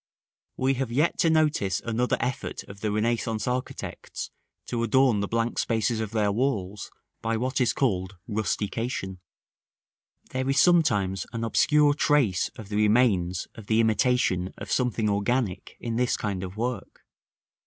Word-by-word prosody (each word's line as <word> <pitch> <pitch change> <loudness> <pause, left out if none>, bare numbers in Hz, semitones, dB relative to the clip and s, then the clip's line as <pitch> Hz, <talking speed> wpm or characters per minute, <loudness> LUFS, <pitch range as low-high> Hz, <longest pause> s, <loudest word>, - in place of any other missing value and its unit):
§ - - -74 0.5
V. - - -5
We 135 +1 +4
have 130 -3 -2
yet 150 +8 +1
to 165 - +4
notice 150 - +2
another 115 +2 0
effort 125 +1 -3
of 100 0 -12
the 105 0 -1
Renaissance 110 0 -1
architects 125 +1 -4 0.3
to 120 -2 -2
adorn 120 -1 +3
the 100 - -1
blank 115 +2 -1
spaces 115 0 0
of 110 -2 -2
their 105 -2 +1
walls 105 -4 -1 0.3
by 115 0 0
what 130 +3 -1
is 120 - +3
called 95 -7 -1
Rustication. 105 -1 -2 1.1
There 130 +1 -1
is 135 0 +3
sometimes 105 - +3
an 115 0 -3
obscure 150 +5 +4
trace 145 - +2
of 110 -3 -10
the 105 - -2
remains 105 -5 +2
of 110 -2 -12
the 110 0 +3
imitation 110 -5 +2
of - - -7
something 120 -4 +1
organic 100 -1 -1
in 115 -1 -3
this 125 0 +1
kind 100 -3 -3
of 95 +2 -7
work. 120 -2 -4
115 Hz, 155 wpm, -26 LUFS, 100-125 Hz, 1.1 s, We